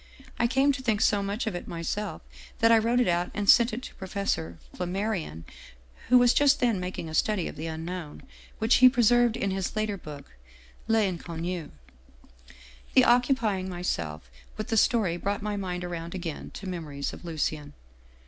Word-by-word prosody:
I 235 - +3
came 270 +3 +3
to 275 -1 -4
think 220 -5 0
so 205 -1 +3
much 200 +5 -3
of 220 - -2
it 175 - -6
myself 170 +5 -4 0.3
that 230 -1 +4
I 225 - +7
wrote 235 +3 +1
it 250 - +2
out 175 0 +1
and 205 -1 -2
sent 235 +3 +6
it 235 +4 -5
to - - -8
Professor 190 - -3 0.2
Flammarion, 180 - -3 0.7
who 250 - +7
was 245 -1 +5
just 290 0 +4
then 235 -6 +2
making 180 -2 -5
a 160 - -7
study 195 +2 +1
of - - -7
the 155 +2 -5
Unknown, 165 0 -6 0.3
which 225 +3 +3
he 255 0 +8
preserved 240 -1 +3
in 200 - -1
his 190 +1 -3
later 215 -2 -1
book 150 -5 -10 0.6
'LTnconnu.' 175 -5 -1 0.7
" 60 0 -22
The 260 - +7
occupying 235 -6 +2
myself 75 - -4 0.3
with 215 +3 -5
the 225 - +1
story 205 -6 +2
brought 200 +3 -2
my 210 -1 -2
mind 180 -3 -4
around 170 0 -5
again 170 -4 -5
to 200 - -8
memories 150 -6 -4
of - - -11
Lucien. 155 -3 -3
190 Hz, 175 wpm, -27 LUFS, 165-225 Hz, 0.7 s, he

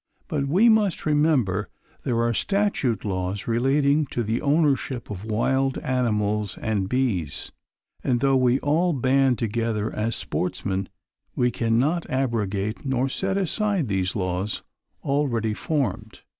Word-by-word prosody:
But 145 -6 -1
we 190 +11 +4
must 215 -5 +3
remember 145 -11 +2 0.3
there 115 -1 0
are 120 0 +1
statute 195 - 0
laws 95 0 -2
relating 140 +5 +2
to 120 - -2
the 110 +2 -1
ownership 140 -5 +1
of 100 -1 -6
wild 130 +5 +1
animals 105 -5 0
and 105 -4 -1
bees, 110 - -1 0.5
and 125 -2 +1
though 135 +1 +3
we 130 -1 +3
all 165 +4 +2
band 135 -1 +2
together 110 -1 -1
as 110 +1 -1
sportsmen, 95 +1 -2 0.5
we 125 0 +2
cannot 125 +10 +1
abrogate 110 -5 -1
nor 135 -1 0
set 195 +7 -1
aside 195 - 0
these 95 -1 0
laws 95 +1 -2 0.4
already 125 -6 0
formed. 115 -5 -2
125 Hz, 130 wpm, -24 LUFS, 105-140 Hz, 0.5 s, we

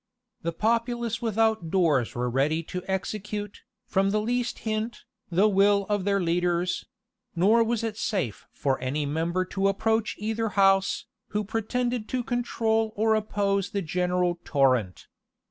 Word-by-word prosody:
The 170 - -1
populace 230 +4 0
without 220 -5 +1
doors 160 -10 +2
were 125 0 -1
ready 145 +6 +1
to 180 +3 -5
execute, 205 +2 -4 0.2
from 195 0 +1
the 210 +2 +1
least 245 +3 -1
hint, 220 +1 -2 0.3
the 185 +4 +4
will 200 0 +4
of 205 -2 0
their 200 -1 +2
leaders; 175 0 0 0.5
nor 210 +7 +4
was 230 0 -1
it 220 -2 -3
safe 180 - -2
for 135 -2 -1
any 140 +3 -1
member 165 +5 -1
to 195 +1 0
approach 220 +2 +1
either 225 +1 -1
house, 195 -1 +3 0.2
who 210 0 -2
pretended 225 +2 -2
to 255 -1 -1
control 225 -2 0
or 220 +1 +3
oppose 200 -2 0
the 200 -2 -2
general 180 +1 0
torrent. 130 - +1
200 Hz, 145 wpm, -26 LUFS, 175-220 Hz, 0.5 s, the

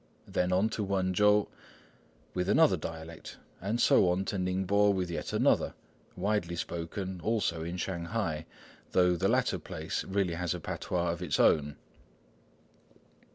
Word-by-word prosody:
Then 90 0 0
on 95 +4 +3
to 110 - -3
Wênchow, 100 +2 +3 0.9
with 90 +1 -1
another 160 +8 +5
dialect, 80 0 -8 0.2
and 105 +5 -1
so 95 - +5
on 90 +2 0
to 100 - -2
Ningpo 95 +3 +2
with 90 -3 -1
yet 85 - -4
another, - - +2 0.4
widely 90 -3 -1
spoken 85 +2 -4
also 95 -6 0
in 85 +2 -4
Shanghai, 85 -3 -3 0.5
though 90 -1 +4
the 85 - +1
latter - - +1
place 80 +7 -4
really 95 -3 0
has 90 0 -2
a - - -5
patois 85 +1 -2
of 85 +1 -5
its 90 -5 -1
own. 75 -1 +3
90 Hz, 140 wpm, -30 LUFS, 85-100 Hz, 0.9 s, another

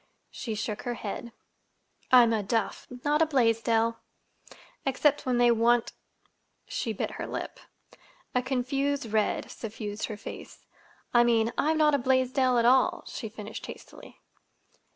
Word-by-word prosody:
She 225 -4 -5
shook 210 -1 -3
her 240 -1 -3
head. 230 +2 -6 0.8
"I'm 240 -3 +7
a 220 - +1
Duff, 225 +3 -2 0.2
not 295 +2 +2
a - - +6
Blaisdell—except 235 +3 -1
when 250 -1 +2
they 240 0 +5
want—" 235 +1 +2 0.7
She 230 - -3
bit 215 - -3
her - - -6
lip. - - -5 0.7
A 250 - +2
confused 270 +2 -1
red 215 -1 0
suffused 215 -2 -5
her 215 - -6
face. - - -10 0.5
"I 240 -1 +6
mean, 230 -1 +2
I'm 315 +2 +1
not 305 -1 +4
a 285 - +3
Blaisdell 260 0 +2
at 235 - +3
all," 255 +2 +4
she 225 - -6
finished 210 0 -8
hastily. - - -12
240 Hz, 135 wpm, -28 LUFS, 225-265 Hz, 0.8 s, I'm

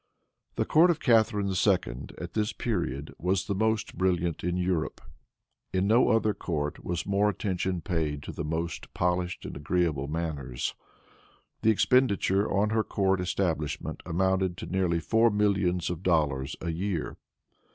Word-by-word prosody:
The - - 0
court 165 +3 +5
of 165 -2 +2
Catharine 110 -5 +3
II. 90 - +1
at - - -7
this 110 +1 0
period 80 - -3
was 90 +2 0
the 100 - -1
most 110 +2 0
brilliant 90 -3 0
in 90 +1 0
Europe. 90 -3 -1 0.7
In 95 0 +1
no 115 +5 +4
other 110 -2 +3
court 75 -6 -3
was 85 -1 -3
more 100 +1 +2
attention 95 -3 -2
paid 80 -6 -2
to - - -6
the - - -5
most 80 +2 -4
polished 90 0 -1
and - - -6
agreeable 75 -2 0
manners. 75 -6 -3 0.9
The 110 - +3
expenditure 105 -3 +3
on 100 +2 +2
her 110 0 +2
court 95 -3 +1
establishment 80 -5 -2
amounted 95 +1 0
to - - -6
nearly 90 -3 0
four 115 +6 +3
millions 100 -5 +1
of 85 -1 -5
dollars 75 -6 +1
a 85 - -2
year. 85 -1 -3
90 Hz, 150 wpm, -28 LUFS, 80-100 Hz, 0.9 s, court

